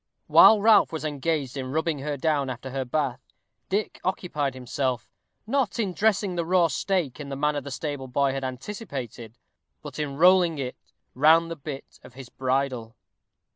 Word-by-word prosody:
While 220 - +7
Ralph 220 +1 +5
was 160 -2 -4
engaged 145 -2 -2
in 130 -1 -4
rubbing 160 0 -1
her 145 +1 -3
down 145 -2 0
after 130 +1 -6
her 135 0 -2
bath, 130 -1 -2 0.5
Dick 205 +2 -2
occupied 150 -7 -2
himself, 130 -2 -2 0.4
not 255 0 0
in 205 -6 -1
dressing 205 -1 +1
the 170 -1 -1
raw 175 0 +3
steak 165 -2 -1
in 145 -2 -7
the 135 - -4
manner 150 +1 0
the 140 - -8
stable 140 -1 -4
boy 135 +2 +1
had 135 0 -4
anticipated, 130 - -6 0.5
but - - -8
in 140 -2 -3
rolling 175 -1 +5
it 130 -2 -4 0.4
round 160 +5 +4
the - - -3
bit 145 -2 -9
of 125 - -15
his 130 -2 -10
bridle. 130 -3 -2
145 Hz, 170 wpm, -26 LUFS, 130-170 Hz, 0.5 s, While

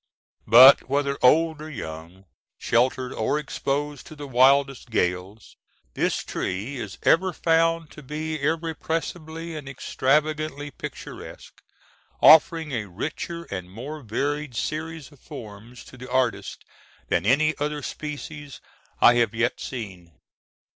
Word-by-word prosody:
But, 130 +5 +8
whether 140 0 0
old 160 +4 +4
or 155 - -7
young, 85 - -8 0.3
sheltered 125 +2 +1
or 110 +6 0
exposed 145 0 -3
to 155 - -11
the 145 -1 -8
wildest 135 0 +3
gales, 90 -1 -2 0.4
this - - -1
tree 105 +10 -4
is 105 -5 -6
ever 185 +3 +4
found 165 -1 +1
to 150 - -12
be 155 +2 -5
irrepressibly 160 +1 -3
and 145 -3 -7
extravagantly 145 +2 -1
picturesque, - - -10 0.6
offering 160 0 +6
a 110 -5 -3
richer 160 - -5
and 90 -2 -5
more 135 +10 -7
varied 140 +4 -3
series 155 +2 -4
of 145 - -19
forms 110 +3 -11
to 130 - -14
the 130 0 -10
artist 130 -2 -1 0.4
than 85 - +1
any 150 +8 +3
other 150 0 -2
species 150 -1 -7 0.4
I 120 - +8
have 115 -1 0
yet 120 +2 0
seen. 95 - -8
140 Hz, 125 wpm, -24 LUFS, 115-155 Hz, 0.6 s, But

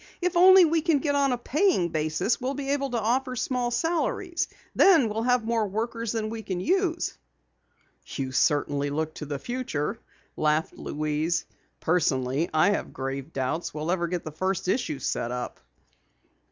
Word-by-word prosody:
If 360 0 -1
only 370 +1 +8
we 325 0 +2
can 320 -2 +3
get 285 +1 0
on 280 -1 +2
a 250 - 0
paying 285 - +1
basis, 155 +9 0
we'll 260 +2 -2
be 275 0 -3
able 280 -1 0
to 240 -2 -1
offer 255 +4 0
small 250 0 -1
salaries. 340 +5 -1 0.3
Then 320 - +6
we'll 215 +2 -2
have 245 -1 +2
more 225 -2 +1
workers 230 +2 -3
than 220 -1 -2
we 225 -1 -5
can 185 -4 -4
use." 350 - 0 0.9
"You 135 -2 -4
certainly 145 +1 +1
look 155 +2 -2
to 150 - -6
the 145 -1 -3
future," 240 - -3 0.4
laughed 155 +1 +1
Louise. 155 +3 -1 0.4
"Personally 145 -3 +1
I 155 +6 +4
have 205 - -3
grave 135 +2 -5
doubts 135 +5 -3
we'll 155 +3 -2
ever 175 -2 0
get 175 0 -3
the 155 - -6
first 185 +4 -2
issue 185 - 0
set 120 -2 -2
up." 125 0 -5
215 Hz, 165 wpm, -26 LUFS, -, 0.9 s, only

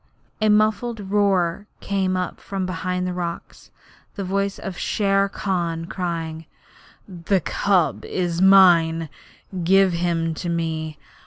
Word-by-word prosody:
A 215 - +3
muffled 215 +2 +2
roar 200 -2 +1
came 190 -2 -1
up 180 -1 -3
from 195 -1 -4
behind 180 0 -2
the 180 - -2
rocks 170 -1 -6 0.5
the 200 - -4
voice 200 +1 -1
of 195 - -6
Shere 195 +1 +1
Khan 170 -5 -2
crying: 165 -3 -4 0.6
'The 185 0 -1
cub 185 0 +1
is 175 -1 -2
mine. 170 -4 +5 0.5
Give 190 +1 +4
him 170 -1 0
to 170 +2 -5
me. 160 -2 -3
180 Hz, 125 wpm, -22 LUFS, 170-195 Hz, 0.6 s, mine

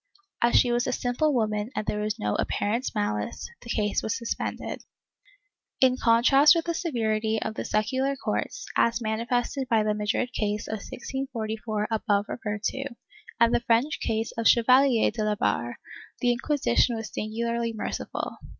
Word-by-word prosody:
As 235 0 +3
she 245 - +5
was 240 0 +1
a - - +1
simple 245 +6 +1
woman 215 -4 0
and 210 - -2
there 210 - -1
was 210 0 -2
no 105 0 -1
apparent 230 +5 -1
malice, 105 0 -2
the 235 - -12
case 210 -3 0
was 220 - -2
suspended.^ 235 -2 -4 1.0
In 255 -1 +5
contrast 260 +6 +5
with 330 - 0
the 340 - -1
severity 220 - 0
of 220 - -3
the - - -4
secular 260 +6 0
courts, - - -3
as 230 0 +3
manifested 240 +4 -1
by 220 -2 +3
the 210 0 +1
Madrid 210 +4 -1
case 210 -1 -2
of 220 - -3
1644 220 -4 -4
above 205 -2 +1
referred 210 -2 -4
to, 270 +5 -2 0.5
and 235 0 +5
the - - +4
French 240 +6 +1
case 225 0 -1
of 230 - -2
the - - +8
Chevalier 250 0 +5
de 220 - -3
La 210 0 +1
Barre, 120 - -1 0.4
the 245 - +3
Inquisition 240 - +1
was 225 -1 -6
singularly 235 +2 -2
merciful. 220 - -4
230 Hz, 165 wpm, -26 LUFS, 215-250 Hz, 1.0 s, the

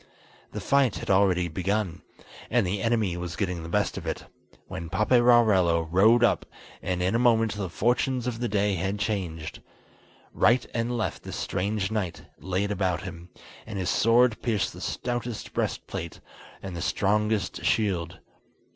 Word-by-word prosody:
The - - -5
fight 140 -4 +3
had - - -3
already 95 -2 +3
begun, 95 +1 -2 0.5
and - - +2
the 95 +2 -2
enemy 110 -6 +1
was 90 -1 -5
getting 90 -4 -2
the 80 - -7
best - - 0
of - - -10
it, - - -3 0.4
when 85 0 -7
Paperarello 105 -5 +4
rode 110 +7 +5
up, 115 - +3 0.4
and 90 -1 -1
in 95 - +1
a 115 - +2
moment 115 -3 +3
the 100 -3 -4
fortunes 120 +5 0
of 120 -2 -3
the 120 - -1
day 100 -1 +1
had 95 +3 -1
changed. 90 -7 -3 0.7
Right 120 +2 +3
and 120 +1 -1
left 110 - -2
this - - -7
strange 100 +1 -1
knight 100 -6 -3 0.2
laid 95 +2 -1
about 95 -3 0
him, 90 -2 -8 0.4
and 110 -2 -5
his 90 -2 0
sword 115 0 +3
pierced 110 -5 0
the - - -10
stoutest 120 -2 -4
breast - - -2
plate, 85 0 -6 0.4
and 95 -2 -6
the 85 - -4
strongest 105 +1 0
shield. 90 -6 0
100 Hz, 160 wpm, -26 LUFS, 90-115 Hz, 0.7 s, rode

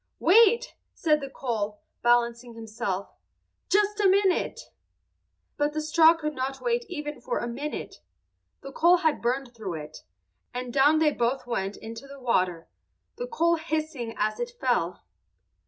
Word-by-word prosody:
"Wait," 460 +6 +5 0.2
said 305 -2 +2
the 275 - -5
coal, 215 -6 -3 0.2
balancing 240 0 +1
himself. 220 -4 -4 0.6
"Just 415 +1 +2
a 400 -2 +5
minute!" 385 -1 +1 0.9
But 290 0 0
the 310 - -1
straw 320 +2 +5
could 305 -2 -3
not 270 0 -3
wait 475 0 0
even 295 -5 -5
for - - -2
a 240 - -2
minute. 280 +6 -5 0.6
The 275 - -8
coal 345 +6 +5
had 315 - +2
burned 250 +1 -1
through 205 -7 -5
it, 155 0 -8 0.6
and 250 -1 -4
down 285 +3 +5
they 310 -1 +4
both 250 +1 -1
went 200 -5 -3
into 225 +4 -9
the 280 0 -11
water, 185 -9 0 0.5
the - - -4
coal 340 -8 +2
hissing 310 -7 -3
as 215 0 -1
it 485 0 -4
fell. 180 -9 0
275 Hz, 150 wpm, -27 LUFS, 235-320 Hz, 0.9 s, Wait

